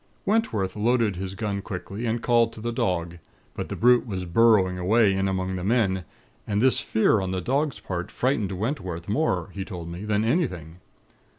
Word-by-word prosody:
"Wentworth 195 Hz, -, 0 dB
loaded 115 Hz, -1 st, +1 dB
his 95 Hz, +1 st, -5 dB
gun 100 Hz, -2 st, -2 dB
quickly, 100 Hz, +4 st, -5 dB
and 115 Hz, +1 st, -1 dB
called 115 Hz, -1 st, +3 dB
to 115 Hz, -, -9 dB
the 120 Hz, +2 st, -3 dB
dog; 85 Hz, -6 st, -1 dB, 0.3 s
but -, -, -5 dB
the -, -, -3 dB
brute 125 Hz, +1 st, +4 dB
was 95 Hz, -4 st, -4 dB
burrowing 95 Hz, -1 st, +4 dB
away 105 Hz, +2 st, +3 dB
in 95 Hz, 0 st, 0 dB
among 95 Hz, -1 st, -2 dB
the 90 Hz, -, -5 dB
men; 95 Hz, -4 st, +1 dB, 0.4 s
and 105 Hz, -1 st, 0 dB
this 130 Hz, +3 st, +3 dB
fear 110 Hz, -1 st, +2 dB
on 95 Hz, -, -3 dB
the 95 Hz, 0 st, -1 dB
dog's 140 Hz, -, -1 dB
part 90 Hz, -2 st, -4 dB
frightened 120 Hz, -6 st, 0 dB
Wentworth 95 Hz, -, -3 dB
more, 100 Hz, -, 0 dB
he 100 Hz, -, -4 dB
told 90 Hz, -4 st, -7 dB
me, 85 Hz, +4 st, -7 dB
than 105 Hz, 0 st, 0 dB
anything. 95 Hz, -, -1 dB
100 Hz, 185 wpm, -25 LUFS, 95-115 Hz, 0.4 s, brute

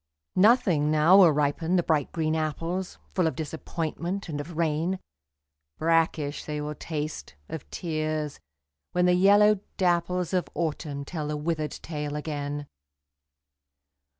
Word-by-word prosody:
Nothing 185 Hz, -, +4 dB
now 155 Hz, +5 st, +6 dB
will 175 Hz, -4 st, +8 dB
ripen 150 Hz, +4 st, +1 dB
the 175 Hz, -, +3 dB
bright 155 Hz, -5 st, +1 dB
green 160 Hz, -1 st, 0 dB
apples, 165 Hz, +4 st, -2 dB, 0.2 s
Full 180 Hz, -3 st, +2 dB
of 160 Hz, -, -2 dB
disappointment 165 Hz, +4 st, -4 dB
and 145 Hz, -2 st, -3 dB
of 160 Hz, +2 st, -9 dB
rain, 165 Hz, +3 st, 0 dB, 0.8 s
Brackish 160 Hz, -2 st, +1 dB
they 150 Hz, -1 st, -3 dB
will 150 Hz, 0 st, -3 dB
taste, 150 Hz, -, -5 dB
of 160 Hz, -, -7 dB
tears, 155 Hz, -3 st, -3 dB, 0.5 s
when 180 Hz, 0 st, +3 dB
the 180 Hz, -, +5 dB
yellow 205 Hz, +3 st, +5 dB, 0.2 s
dapples 180 Hz, 0 st, +1 dB
Of 180 Hz, -1 st, 0 dB
Autumn 150 Hz, -3 st, -3 dB
tell 155 Hz, -1 st, -4 dB
the 150 Hz, 0 st, -2 dB
withered 155 Hz, -1 st, -2 dB
tale 150 Hz, -2 st, -4 dB
again. 145 Hz, -1 st, -4 dB
160 Hz, 130 wpm, -27 LUFS, 150-175 Hz, 0.8 s, will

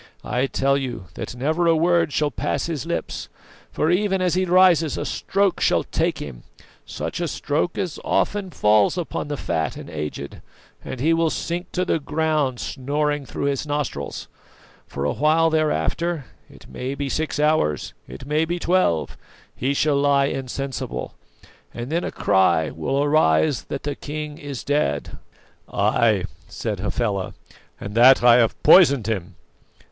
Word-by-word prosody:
I 125 Hz, +2 st, 0 dB
tell 140 Hz, +1 st, +1 dB
you 120 Hz, -7 st, -5 dB
that -, -, -6 dB
never 155 Hz, +7 st, 0 dB
a 165 Hz, -, +5 dB
word 170 Hz, -1 st, +2 dB
will 150 Hz, -1 st, +1 dB
pass -, -, -2 dB
his 160 Hz, -6 st, -4 dB
lips; -, -, -4 dB, 0.4 s
for 155 Hz, -, +1 dB
even 195 Hz, +1 st, +1 dB
as 180 Hz, -2 st, +1 dB
he 185 Hz, +1 st, +1 dB
rises 175 Hz, -3 st, +4 dB
a -, -, -3 dB
stroke 195 Hz, -1 st, 0 dB
shall -, -, +3 dB
take -, -, -1 dB
him, 65 Hz, -5 st, -8 dB, 0.5 s
such -, -, -5 dB
a 170 Hz, -, -1 dB
stroke 155 Hz, +4 st, -2 dB
as 180 Hz, -6 st, -3 dB
often 200 Hz, -2 st, 0 dB
falls 105 Hz, -, +3 dB
upon 170 Hz, -3 st, -3 dB
the 145 Hz, -1 st, -3 dB
fat 80 Hz, -9 st, -2 dB
and -, -, -9 dB
aged, 75 Hz, -2 st, -6 dB, 0.4 s
and 130 Hz, -, -6 dB
he 160 Hz, +6 st, +3 dB
will 165 Hz, 0 st, +2 dB
sink 175 Hz, +3 st, -4 dB
to 185 Hz, 0 st, 0 dB
the 165 Hz, -, +1 dB
ground 150 Hz, -4 st, 0 dB
snoring 145 Hz, +1 st, -2 dB
through -, -, -5 dB
his 140 Hz, +1 st, -1 dB
nostrils. 145 Hz, -, -3 dB, 0.6 s
For 70 Hz, -, -5 dB
a 75 Hz, -, +1 dB
while 160 Hz, +2 st, +3 dB
thereafter 160 Hz, 0 st, 0 dB, 0.2 s
it -, -, -16 dB
may 130 Hz, +2 st, -5 dB
be 140 Hz, 0 st, -3 dB
six 155 Hz, +2 st, -2 dB
hours, 150 Hz, -, +1 dB
it -, -, -10 dB
may 150 Hz, +3 st, +1 dB
be 170 Hz, +2 st, -2 dB
twelve 175 Hz, -, +1 dB, 0.4 s
he 130 Hz, +3 st, -1 dB
shall 145 Hz, 0 st, +2 dB
lie 140 Hz, -1 st, +3 dB
insensible, 135 Hz, 0 st, -4 dB, 0.6 s
and 120 Hz, +4 st, -5 dB
then 170 Hz, +2 st, 0 dB
a -, -, -3 dB
cry 85 Hz, -5 st, +2 dB
will 135 Hz, -, -1 dB
arise 145 Hz, -, +2 dB
that -, -, -5 dB
the 145 Hz, -, -2 dB
king 150 Hz, +1 st, -6 dB
is 140 Hz, -3 st, -6 dB
dead!" 145 Hz, -, -1 dB, 0.5 s
"Ay," -, -, +2 dB, 0.2 s
said 105 Hz, -4 st, -4 dB
Hafela, 100 Hz, -1 st, -2 dB, 0.4 s
"and 100 Hz, -, -7 dB
that 125 Hz, +3 st, +6 dB
I 120 Hz, -1 st, +7 dB
have 115 Hz, -2 st, +1 dB
poisoned 140 Hz, -, +6 dB
him!" 100 Hz, -6 st, -3 dB
145 Hz, 160 wpm, -22 LUFS, 120-160 Hz, 0.6 s, I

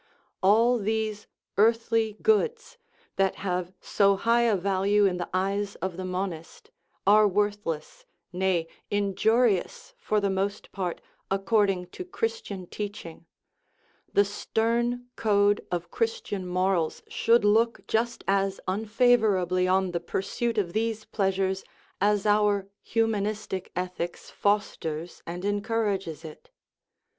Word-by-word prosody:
All 230 Hz, +5 st, +4 dB
these 215 Hz, 0 st, -2 dB
" -, -, -60 dB
earthly 225 Hz, 0 st, +2 dB
goods," 465 Hz, +2 st, +1 dB, 0.4 s
that 195 Hz, -1 st, +2 dB
have 180 Hz, -2 st, -2 dB
so 200 Hz, -1 st, +3 dB
high 230 Hz, +4 st, +2 dB
a 230 Hz, -3 st, +3 dB
value 200 Hz, +2 st, +2 dB
in 185 Hz, -2 st, +1 dB
the 175 Hz, -, -4 dB
eyes 195 Hz, +2 st, -1 dB
of 185 Hz, 0 st, -4 dB
the 185 Hz, -, -5 dB
monist, 185 Hz, -3 st, -5 dB, 0.3 s
are 210 Hz, +2 st, +6 dB
worthless 205 Hz, -5 st, -2 dB, 0.3 s
nay, 180 Hz, -2 st, +1 dB, 0.2 s
injurious 220 Hz, -, +1 dB
for 215 Hz, -, +1 dB
the 200 Hz, -1 st, 0 dB
most 195 Hz, +2 st, -2 dB
part, 180 Hz, -3 st, -3 dB, 0.3 s
according 195 Hz, -1 st, +1 dB
to -, -, -6 dB
Christian 390 Hz, -, -4 dB
teaching; 175 Hz, -4 st, -7 dB, 0.8 s
the 200 Hz, -, +4 dB
stern 235 Hz, +4 st, -1 dB
code 205 Hz, -1 st, +2 dB
of 175 Hz, -1 st, -3 dB
Christian 455 Hz, -, -2 dB
morals 180 Hz, -2 st, 0 dB
should 230 Hz, -2 st, +3 dB
look 225 Hz, +3 st, +2 dB
just 235 Hz, +2 st, -1 dB
as 195 Hz, 0 st, +1 dB
un 200 Hz, +4 st, -1 dB
favorably 210 Hz, -6 st, +3 dB
on 190 Hz, 0 st, +2 dB
the 170 Hz, -, -1 dB
pursuit 220 Hz, +6 st, -2 dB
of 180 Hz, -5 st, 0 dB
these 220 Hz, 0 st, -1 dB
pleasures 190 Hz, -1 st, 0 dB, 0.4 s
as 205 Hz, 0 st, +2 dB
our 205 Hz, -2 st, +3 dB, 0.2 s
hu 225 Hz, -1 st, +3 dB
manistic 210 Hz, -3 st, -3 dB
ethics 180 Hz, -1 st, -4 dB
fosters 175 Hz, -5 st, -1 dB
and 175 Hz, +3 st, -5 dB
encourages 205 Hz, -, -1 dB
it. 155 Hz, -, -11 dB
205 Hz, 125 wpm, -27 LUFS, 185-220 Hz, 0.8 s, are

